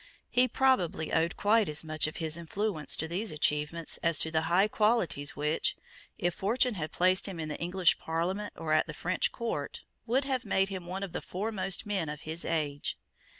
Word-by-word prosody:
He 250 +1 +5
probably 225 -12 +1
owed 165 +2 +1
quite 215 -1 +3
as 150 +1 0
much 155 -1 -1
of 155 - -6
his 160 -2 -1
influence 170 -1 -1
to 160 - -2
these 190 +7 -1
achievements 150 +2 0
as 170 -2 +4
to 160 - +1
the 160 -1 +2
high 190 +4 +4
qualities 210 -10 +1
which, 150 +2 0 0.4
if 175 0 0
fortune 235 +7 +2
had 160 -6 -4
placed 185 +2 +3
him 185 -4 -6
in 155 -1 -3
the 150 - -5
English 180 0 +2
Parliament 180 +6 -2
or 155 -1 -1
at 155 - +3
the 150 - -7
French 180 +3 0
court, 225 -12 -4 0.2
would 255 +5 +2
have 260 -2 -1
made 195 -4 +1
him 185 -3 -6
one 190 +2 -4
of 195 - -5
the - - -4
foremost 195 -1 -2
men 195 -7 -1
of 150 0 -6
his 160 +2 -3
age. 150 -3 -1
175 Hz, 195 wpm, -30 LUFS, 155-205 Hz, 0.4 s, He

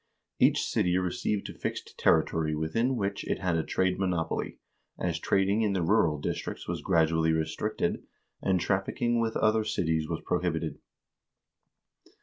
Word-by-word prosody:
Each - - +4
city 90 0 +1
received 95 +3 -1
a - - -7
fixed - - -5
territory 80 -1 +2
within 115 +12 0
which 100 -3 -2
it - - -1
had 90 -3 0
a 80 - +2
trade 95 +2 0
monopoly, 90 -4 -1 0.4
as 85 -2 -1
trading 100 +4 +2
in 105 -3 +1
the 95 -3 0
rural 85 -5 +3
districts 70 - -4
was - - -3
gradually 80 0 +2
restricted, 80 +7 -1 0.4
and 95 -1 +2
trafficking 115 +6 0
with 115 -1 0
other 110 0 +3
cities 80 -7 -1
was - - -3
prohibited. 80 -3 -1
90 Hz, 140 wpm, -29 LUFS, 80-105 Hz, 0.4 s, Each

